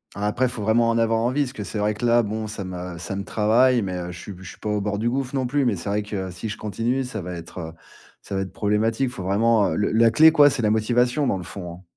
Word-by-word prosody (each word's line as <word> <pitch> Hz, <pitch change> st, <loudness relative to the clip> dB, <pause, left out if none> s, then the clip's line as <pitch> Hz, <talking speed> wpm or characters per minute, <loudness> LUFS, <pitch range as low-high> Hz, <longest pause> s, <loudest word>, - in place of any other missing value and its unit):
Ah, 100 Hz, +1 st, -3 dB
après, 120 Hz, +5 st, +1 dB
il -, -, +1 dB
faut 115 Hz, -3 st, -5 dB
vraiment 115 Hz, +2 st, +3 dB
en 115 Hz, -, +1 dB
avoir 115 Hz, 0 st, +2 dB
envie 130 Hz, +5 st, +1 dB
parce 130 Hz, -1 st, -6 dB
que 110 Hz, -, -6 dB
c'est 105 Hz, -, -6 dB
vrai 105 Hz, +1 st, +1 dB
que, 105 Hz, -, -9 dB
là, 120 Hz, 0 st, +4 dB
bon, 110 Hz, +1 st, -3 dB
ça 105 Hz, -2 st, -6 dB
me 90 Hz, -1 st, -6 dB
ça 90 Hz, +3 st, -5 dB
me 100 Hz, -, -3 dB
travaille, 115 Hz, +4 st, +3 dB
mais 95 Hz, -2 st, -3 dB
heu, 90 Hz, 0 st, -5 dB
je 90 Hz, -, -9 dB
suis 100 Hz, -, -8 dB
b 90 Hz, -, -14 dB
je 95 Hz, -, -9 dB
suis -, -, -12 dB
pas 105 Hz, -, -5 dB
au 105 Hz, -1 st, 0 dB
bord 105 Hz, 0 st, -2 dB
du 110 Hz, +3 st, -1 dB
gouffre, 130 Hz, +2 st, -2 dB
non 130 Hz, -1 st, 0 dB
plus, 140 Hz, +2 st, +1 dB
mais 120 Hz, -4 st, +2 dB
c'est 90 Hz, +3 st, -8 dB
vrai 105 Hz, +1 st, 0 dB
que 100 Hz, -3 st, -5 dB
si 90 Hz, +5 st, -6 dB
je 105 Hz, -, -5 dB
continue, 115 Hz, +5 st, -1 dB
ça 125 Hz, -5 st, -5 dB
va 90 Hz, +1 st, -6 dB
être, 85 Hz, +2 st, -9 dB
heu, 80 Hz, -2 st, -6 dB, 0.5 s
ça -, -, -8 dB
va 95 Hz, -, 0 dB
être 95 Hz, -, -5 dB
problématique. 110 Hz, +5 st, 0 dB
Faut 125 Hz, -, -7 dB
vraiment 105 Hz, +2 st, +3 dB
heu, -, -, -2 dB
le 105 Hz, -, 0 dB
la 115 Hz, +1 st, +5 dB
clé, 155 Hz, +8 st, +7 dB
quoi, 145 Hz, -2 st, +6 dB
c'est 135 Hz, -3 st, -2 dB
la 105 Hz, -, +3 dB
motivation, 120 Hz, +5 st, +1 dB
dans 95 Hz, -, +1 dB
le 90 Hz, -, -7 dB
fond, 90 Hz, 0 st, -7 dB
hein. 90 Hz, +2 st, -14 dB
110 Hz, 315 wpm, -23 LUFS, 100-120 Hz, 0.5 s, clé